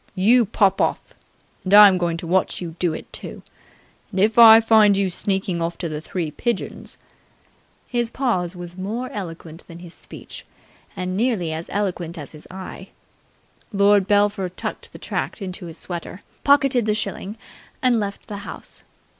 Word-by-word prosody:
"You 225 +4 +4
pop 195 -2 +2
off. - - -1 0.5
And 195 +2 +3
I'm 205 -3 +9
going 170 -1 -1
to 170 - -7
watch 185 +3 +1
you 170 -3 -6
do 175 -2 +1
it, 155 - -8
too. - - -8 0.7
And, 195 - -4
if 220 +4 +3
I 225 -1 +10
find 220 -3 +5
you 195 -2 0
sneakin' 190 -1 -2
off 165 +1 -2
to 170 - -3
the 155 -1 -5
Three 165 -2 -4
Pigeons.. 235 +9 -3 0.5
." - - -37
His 240 -2 0
pause 195 -9 -1
was 175 0 -8
more 220 +7 -4
eloquent 165 -4 -7
than 170 - -11
his 175 -1 -11
speech - - -11 0.5
and 185 0 -3
nearly 205 -7 0
as 160 +1 -6
eloquent 180 -4 -2
as 145 -3 -8
his 155 -1 -13
eye. 190 0 -9 0.8
Lord 200 -1 +4
Belpher 205 -2 +2
tucked 180 - -6
the - - -11
tract - - -4
into 185 -2 -6
his 165 0 -8
sweater, 175 +2 -7 0.2
pocketed 275 -5 +3
the 210 - +2
shilling, 205 0 -4 0.5
and 245 -3 +3
left 200 -1 -5
the 205 - -7
house. 200 - -8
190 Hz, 170 wpm, -22 LUFS, 175-215 Hz, 0.8 s, I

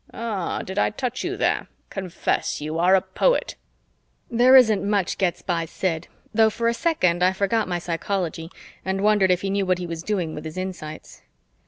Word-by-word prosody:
Ah, 215 -7 -3
did 190 +2 -4
I - - +3
touch 250 +3 -4
you - - -3
there? - - 0 0.2
Confess, 190 -3 -2
you 155 +2 -3
are 180 +3 +5
a 185 - +2
poet." 345 - +1 0.8
There 245 +3 +6
isn't 220 -6 +6
much 200 -2 0
gets 180 -3 0
by 170 -2 -1
Sid, 165 0 -3 0.3
though 220 0 +5
for 230 +2 -2
a 235 - +3
second 230 - +1
I 185 +1 +4
forgot 205 +3 0
my 175 -1 -1
psychology 170 -1 -3 0.3
and 190 +1 -2
wondered 205 -2 +4
if 180 0 +2
he 195 - -2
knew 200 -1 0
what 185 -1 +2
he 180 - -5
was 165 -1 -5
doing 175 -4 -2
with 150 - -7
his 160 +2 -7
insights. 180 -5 -7
190 Hz, 190 wpm, -23 LUFS, 175-210 Hz, 0.8 s, There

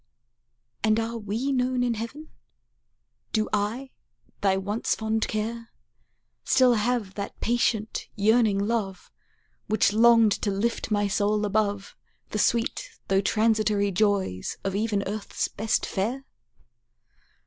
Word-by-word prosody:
And 215 0 +3
are 230 +1 -3
we 220 +6 -2
known 255 -1 +1
in 240 -1 +1
heaven? 235 +8 -7 1.0
Do 215 -1 +1
I, 220 +6 -1 0.5
thy 195 -1 +2
once 205 +4 -1
fond 220 0 -1
care, 230 +2 -3 0.7
Still 260 -2 +4
have 225 -3 0
that 200 0 -6
patient 225 -2 0
yearning 215 0 +3
love 200 -3 -2 0.6
Which 210 -1 +2
longed 230 -1 +6
to 210 - 0
lift 210 +5 -1
my 205 -1 +1
soul 210 +1 +1
above 205 -1 -1 0.3
The 210 - -3
sweet 230 +2 0 0.2
though 195 0 +3
transitory 215 -1 +2
joys 190 - 0
of 195 0 -2
even 205 -1 0
earth's 210 -1 -3
best 220 +1 -1
fare? 240 +8 -2
215 Hz, 120 wpm, -26 LUFS, 205-230 Hz, 1.0 s, longed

